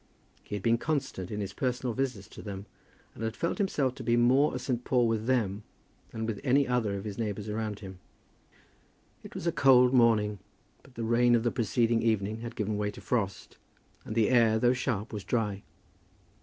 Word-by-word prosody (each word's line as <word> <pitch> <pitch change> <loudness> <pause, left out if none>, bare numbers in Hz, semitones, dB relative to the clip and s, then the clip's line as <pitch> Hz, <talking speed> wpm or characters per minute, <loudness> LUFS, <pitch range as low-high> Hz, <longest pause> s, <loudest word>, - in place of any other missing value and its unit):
He - - -6
had 100 - -5
been 115 0 +3
constant 135 - -2
in 105 -1 -4
his 100 0 -5
personal 125 -1 -2
visits 125 -6 -3
to - - -11
them, 100 -1 -7 0.5
and 115 - -8
had 110 0 -2
felt 170 - -2
himself 145 -10 +1
to - - -9
be 120 0 +2
more 130 +5 +4
a - - -1
St. 125 -2 -2
Paul 125 -2 +2
with 115 0 -1
them 110 -6 +1 0.5
than 110 0 -4
with 110 -3 -4
any 140 +1 +3
other 115 -5 0
of 100 - -6
his 105 -1 -6
neighbours 105 -2 -3
around 105 -1 -3
him. 95 -2 -9 1.2
It - - -12
was - - -5
a 170 - +2
cold 125 -3 +5
morning, 110 -5 +3 0.4
but 135 - -20
the 115 - -4
rain 120 +1 +4
of 115 - +1
the 120 - +1
preceding 115 -1 +1
evening 110 -1 0
had 115 0 -7
given 105 0 -2
way 105 0 0
to 105 - -9
frost, 100 -5 -3 0.5
and 110 - -6
the 110 -3 +3
air, 115 -3 +4
though 120 +2 +3
sharp, 120 -4 -2
was 105 -2 -5
dry. 105 -4 -1
115 Hz, 200 wpm, -29 LUFS, 105-125 Hz, 1.2 s, cold